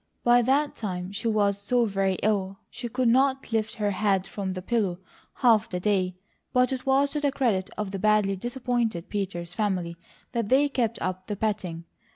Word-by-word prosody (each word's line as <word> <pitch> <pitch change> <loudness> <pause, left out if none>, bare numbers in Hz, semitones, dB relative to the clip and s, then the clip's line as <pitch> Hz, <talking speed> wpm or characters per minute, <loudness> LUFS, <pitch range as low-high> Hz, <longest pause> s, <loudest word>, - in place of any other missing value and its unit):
By 240 0 +6
that 275 +4 +1
time 185 -3 -4
she 220 +3 -3
was 200 -2 +1
so 240 +3 +2
very 195 -2 0
ill, 195 -2 0
she 245 -1 -6
could 250 +1 0
not 265 +2 +2
lift 225 -1 0
her 210 -3 0
head 195 -1 +1
from 195 -1 -4
the 185 - -5
pillow 200 -5 0 0.4
half 230 -5 +4
the 180 - -3
day, 185 -2 +1 0.4
but 250 +1 +3
it 260 0 -5
was 275 +1 +3
to 300 - -1
the 285 -1 +2
credit 225 -9 0
of 210 -2 -3
the 195 - -4
badly 210 -1 +3
disappointed 240 -4 -2
Peters 180 -4 -3
family 185 -5 -1 0.4
that 230 -4 -2
they 280 +3 +4
kept 235 -4 -1
up 185 0 -3
the 210 - -2
petting. 185 -6 -2
210 Hz, 190 wpm, -26 LUFS, 190-245 Hz, 0.4 s, By